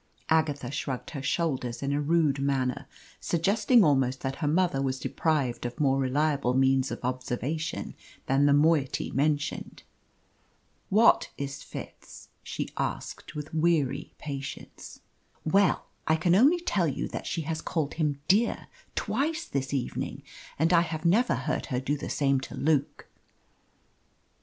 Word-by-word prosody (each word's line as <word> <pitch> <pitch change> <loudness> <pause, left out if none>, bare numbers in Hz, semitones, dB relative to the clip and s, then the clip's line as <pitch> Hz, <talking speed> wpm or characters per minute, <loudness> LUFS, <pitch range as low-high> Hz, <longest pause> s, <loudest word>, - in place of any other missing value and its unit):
Agatha 145 -5 +1
shrugged 135 -3 -4
her 140 - -5
shoulders 130 -4 -1
in 140 +1 0
a 145 - +1
rude 150 -2 +2
manner, 135 -2 -1 0.3
suggesting 210 +7 +3
almost 135 -4 +2
that 135 0 -3
her 150 - -1
mother 165 -3 +2
was 135 -1 -1
deprived 140 -3 -1
of 120 0 -5
more 135 -2 +3
reliable 135 -1 +1
means 135 0 +3
of - - -4
observation 130 +5 -3 0.3
than 135 +2 +3
the - - +4
moiety 145 -1 +2
mentioned. 145 +1 -1 1.1
"What 220 +4 +5
is 140 -1 -5
Fitz?" - - -10
she - - -4
asked, - - -4
with 150 +1 -6
weary 160 -4 +1
patience. 140 -2 -7 0.4
"Well, 195 +4 +3 0.2
I 160 - +4
can 170 +2 +2
only 280 - +5
tell 190 - +1
you 140 - -2
that - - -5
she 165 - -2
has 160 +1 -3
called 155 -4 -2
him 150 -4 -1
'dear' 215 +6 +2 0.3
twice 310 +8 -1
this 135 -1 -3
evening, 135 -3 -3 0.3
and 165 +4 +2
I 170 - +6
have 165 -1 -4
never 210 - +3
heard 130 +3 -2
her 125 - -1
do 135 +3 -1
the 145 - -6
same 135 -2 +2
to 130 - -8
Luke." 150 -2 0
145 Hz, 145 wpm, -28 LUFS, 135-165 Hz, 1.1 s, I